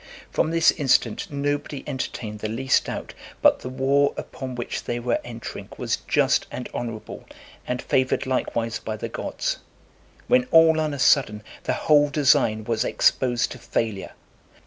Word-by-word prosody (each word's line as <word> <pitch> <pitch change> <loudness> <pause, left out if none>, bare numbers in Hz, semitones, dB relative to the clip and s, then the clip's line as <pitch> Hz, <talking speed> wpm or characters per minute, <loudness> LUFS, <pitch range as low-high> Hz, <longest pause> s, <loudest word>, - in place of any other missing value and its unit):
From - - +1
this 165 0 +4
incident, 135 - +1
nobody 145 -1 -2
entertained 110 -5 -5
the 110 - -3
least 130 +4 +1
doubt - - -5 0.3
but - - +5
the 125 - -6
war 135 +2 +2
upon 130 -2 -6
which 120 - -4
they 120 - -2
were 120 0 0
entering 115 -1 -8
was - - -1
just - - +2
and 125 - -6
honourable, 115 -3 -6 0.4
and 125 0 -2
favoured 130 +1 +1
likewise 115 -3 -1
by 110 -1 -5
the 115 - -5
gods; - - -3 0.7
when 250 0 +4
all 160 -1 +6
on 155 -2 -1
a - - -6
sudden 120 -6 +3 0.2
the - - +1
whole 145 -1 +5
design 130 -7 +3
was 115 0 0
exposed 120 -2 +1
to 125 - -8
failure. 110 -4 -3
130 Hz, 155 wpm, -24 LUFS, 115-145 Hz, 0.7 s, all